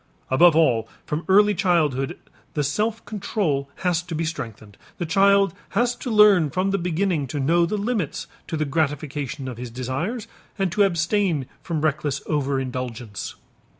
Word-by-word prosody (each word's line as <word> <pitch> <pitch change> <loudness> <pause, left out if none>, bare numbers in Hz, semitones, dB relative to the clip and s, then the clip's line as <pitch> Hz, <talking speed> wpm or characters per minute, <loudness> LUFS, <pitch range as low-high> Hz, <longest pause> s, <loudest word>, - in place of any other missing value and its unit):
Above 165 +5 +6
all, 120 -9 +3 0.2
from 150 +3 -3
early 205 +2 +6
childhood 160 -8 +1 0.4
the 150 - +1
self 210 +11 -1
control 170 -9 -1 0.2
has 175 -2 +2
to 175 -2 -6
be 165 +1 -1
strengthened, 110 -9 -6 0.2
the 175 - -2
child 195 +2 +4 0.2
has 240 +1 +3
to 250 - -6
learn 210 -7 +6
from 185 +5 0
the 195 - +1
beginning 175 -3 0
to 145 +3 -4
know 170 +5 +3
the 210 - -1
limits 205 - -2 0.2
to 160 - -3
the 155 - 0
gratification 145 -2 -2
of 125 -3 -6
his 125 0 -6
desires 130 - -3 0.3
and 195 -3 0
to 205 - +1
abstain 175 -4 +2 0.2
from 165 -4 -3
reckless 150 -2 0
over 140 -3 0
indulgence. 125 -5 -5
160 Hz, 160 wpm, -23 LUFS, 135-195 Hz, 0.4 s, Above